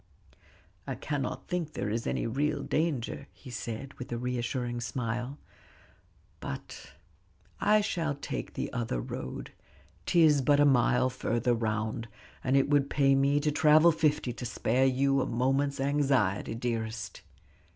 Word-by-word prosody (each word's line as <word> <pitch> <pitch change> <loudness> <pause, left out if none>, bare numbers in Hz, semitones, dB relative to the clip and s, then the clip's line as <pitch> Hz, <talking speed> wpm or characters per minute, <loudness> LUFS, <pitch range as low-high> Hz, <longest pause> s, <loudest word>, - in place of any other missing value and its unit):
"I - - -2
cannot 145 -3 -3
think 175 -4 -2
there 105 - -2
is 115 +1 -2
any - - -1
real 140 +4 -1
danger," 145 -4 -1
he 130 - -12
said, 120 +4 -5
with 125 - -7
a 120 - -1
reassuring 120 0 -2
smile, 120 +3 -3 1.0
"but - - -8 0.7
I 215 0 +4
shall 165 -7 -1
take 140 - -5
the - - -3
other 115 - -2
road; 65 +1 -6 0.6
'tis 155 -4 +5
but 145 +2 +3
a 145 - +6
mile 130 -1 +3
further 120 +1 0
round, 110 0 -2 0.4
and 135 +1 +3
it 135 - +3
would 145 -1 +2
pay 135 -1 +3
me 140 +1 +3
to 150 0 +1
travel 155 +3 +6
fifty 150 -6 +1
to 125 - -8
spare 125 +2 +1
you 135 +1 +2
a - - -1
moment's 135 +4 0
anxiety, 135 -8 +1
dearest." 110 -4 -3
130 Hz, 140 wpm, -29 LUFS, 120-145 Hz, 1.0 s, a